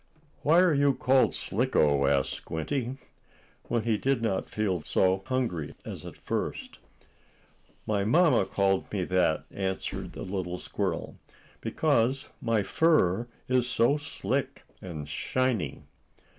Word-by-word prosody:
"Why 165 +4 +5
are 180 -3 +4
you 140 -1 +3
called 130 +1 +3
Slicko?" 75 - +2
asked 70 -1 +2
Squinty, 125 - -3 0.7
when 120 -2 0
he 110 -2 +1
did 135 -2 +1
not 100 -4 -1
feel 105 -4 0
quite 75 - -15
so 95 0 +2
hungry 115 - -2
as - - -7
at - - -10
first. - - -4 1.1
"My 100 -2 0
mamma 125 - +4
called 95 -1 +1
me 100 -3 -1
that," 90 -3 +1
answered 95 -1 -3
the - - -6
little 90 -2 -3
squirrel, - - -3 0.4
"because 130 +4 +1
my 115 -4 +1
fur 120 - +2 0.2
is 125 -1 +2
so 125 +4 +3
slick 150 +2 -3 0.2
and 80 -6 -6
shiny." 125 - -1
110 Hz, 130 wpm, -28 LUFS, 95-130 Hz, 1.1 s, Why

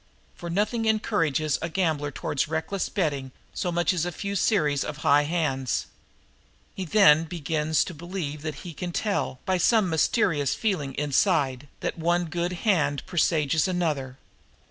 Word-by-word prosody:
For 170 - -8
nothing 215 +6 0
encourages 165 -9 +1
a 170 - -2
gambler 160 -4 0
toward 145 0 -2
reckless 160 +5 -2
betting 145 -9 -1 0.2
so 180 - -2
much 175 +2 +1
as 170 -4 0
a 175 - -2
few 200 +3 -4
series 155 -9 +2
of 150 - -5
high 145 +1 +5
hands. 145 -6 -1 0.9
He 190 - -5
then 165 -4 +5
begins 155 -1 0
to 185 - -7
believe 165 -3 -5
that 155 0 -4
he 175 - -6
can 175 +3 -5
tell, 200 -11 -1
by 185 -1 +1
some 210 -1 +3
mysterious 160 - +2
feeling 155 - -1
inside, 145 -2 +1
that - - -3
one 175 +2 +1
good 175 +2 -2
hand 160 -9 +2
presages 160 -3 +1
another. 150 -8 -2
165 Hz, 150 wpm, -26 LUFS, 145-185 Hz, 0.9 s, high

